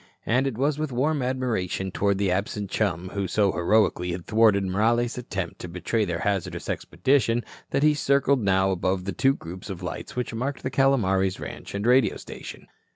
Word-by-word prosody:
And 125 Hz, +4 st, +2 dB
it 125 Hz, -5 st, -3 dB
was 145 Hz, +3 st, +1 dB
with 155 Hz, -2 st, -2 dB
warm 145 Hz, +4 st, +1 dB
admiration 120 Hz, -8 st, -1 dB
toward 100 Hz, +1 st, +1 dB
the 100 Hz, -2 st, +1 dB
absent 100 Hz, +1 st, -2 dB
chum 90 Hz, -4 st, -1 dB
who 100 Hz, 0 st, -2 dB
so 100 Hz, +2 st, +2 dB
heroically 90 Hz, -1 st, +2 dB
had 85 Hz, -1 st, -6 dB
thwarted 110 Hz, -3 st, +4 dB
Morales' 115 Hz, +5 st, +1 dB
attempt 95 Hz, -7 st, -5 dB
to -, -, -6 dB
betray 90 Hz, +6 st, -1 dB
their 85 Hz, -2 st, -3 dB
hazardous 90 Hz, -4 st, -2 dB
expedition 120 Hz, -4 st, +1 dB, 0.3 s
that 140 Hz, -, 0 dB
he 150 Hz, 0 st, +5 dB
circled 140 Hz, -2 st, +2 dB
now 95 Hz, -1 st, +2 dB
above 95 Hz, 0 st, -1 dB
the 100 Hz, -, -2 dB
two 135 Hz, +1 st, +3 dB
groups 90 Hz, +1 st, -9 dB
of 95 Hz, -2 st, -6 dB
lights 90 Hz, -, -6 dB
which 125 Hz, -1 st, -3 dB
marked 130 Hz, +4 st, -3 dB
the 130 Hz, -, -2 dB
Calomares 95 Hz, -9 st, +2 dB
ranch -, -, -7 dB
and 100 Hz, +1 st, -2 dB
radio 125 Hz, -4 st, +4 dB
station. -, -, -9 dB
105 Hz, 185 wpm, -25 LUFS, 95-125 Hz, 0.3 s, he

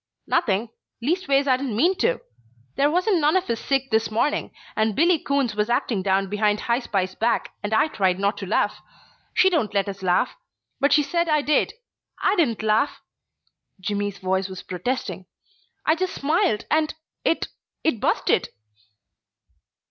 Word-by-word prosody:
"Nothing 215 Hz, 0 st, +1 dB, 0.3 s
leastways 280 Hz, 0 st, +1 dB
I 260 Hz, -1 st, +4 dB
didn't 260 Hz, -5 st, -3 dB
mean 340 Hz, -, +4 dB
to. -, -, +1 dB, 0.5 s
There 285 Hz, +1 st, +3 dB
wasn't 360 Hz, +3 st, +2 dB
none 300 Hz, +5 st, +4 dB
of 370 Hz, -, -2 dB
us 230 Hz, -1 st, -1 dB
sick 270 Hz, -2 st, -1 dB
this 220 Hz, 0 st, +2 dB
morning, 230 Hz, +7 st, 0 dB, 0.2 s
and 220 Hz, -1 st, +1 dB
Billy 335 Hz, +3 st, +4 dB
Coons 280 Hz, -6 st, 0 dB
was 210 Hz, +2 st, 0 dB
acting 235 Hz, -4 st, 0 dB
down 195 Hz, 0 st, +1 dB
behind 210 Hz, +1 st, +1 dB
High 235 Hz, +1 st, +1 dB
Spy's 190 Hz, -6 st, -2 dB
back, 230 Hz, +4 st, 0 dB
and 205 Hz, 0 st, -4 dB
I 220 Hz, +7 st, +4 dB
tried 190 Hz, -10 st, +1 dB
not 200 Hz, +1 st, +1 dB
to 195 Hz, -, -5 dB
laugh. 210 Hz, -, 0 dB, 0.5 s
She -, -, +5 dB
don't 240 Hz, -, 0 dB
let 200 Hz, 0 st, +2 dB
us 195 Hz, -1 st, -6 dB
laugh. 180 Hz, -1 st, +1 dB, 0.4 s
But 285 Hz, +1 st, +3 dB
she 295 Hz, 0 st, +5 dB
said 340 Hz, +4 st, 0 dB
I 300 Hz, -1 st, +3 dB
did. 300 Hz, 0 st, +2 dB, 0.5 s
I -, -, +2 dB
didn't 240 Hz, -, +1 dB
laugh 220 Hz, +6 st, +1 dB, 0.4 s
" -, -, -47 dB
Jimmy's 205 Hz, +1 st, -2 dB
voice 190 Hz, 0 st, -1 dB
was 185 Hz, -1 st, -8 dB
protesting. 185 Hz, -1 st, -3 dB, 0.6 s
"I 315 Hz, -, +5 dB
just 370 Hz, +3 st, -2 dB
smiled 310 Hz, -, +1 dB
and 310 Hz, 0 st, +2 dB, 0.3 s
it 330 Hz, -, 0 dB, 0.3 s
it 280 Hz, -9 st, +1 dB
busted." -, -, +1 dB
235 Hz, 165 wpm, -24 LUFS, 200-295 Hz, 0.6 s, She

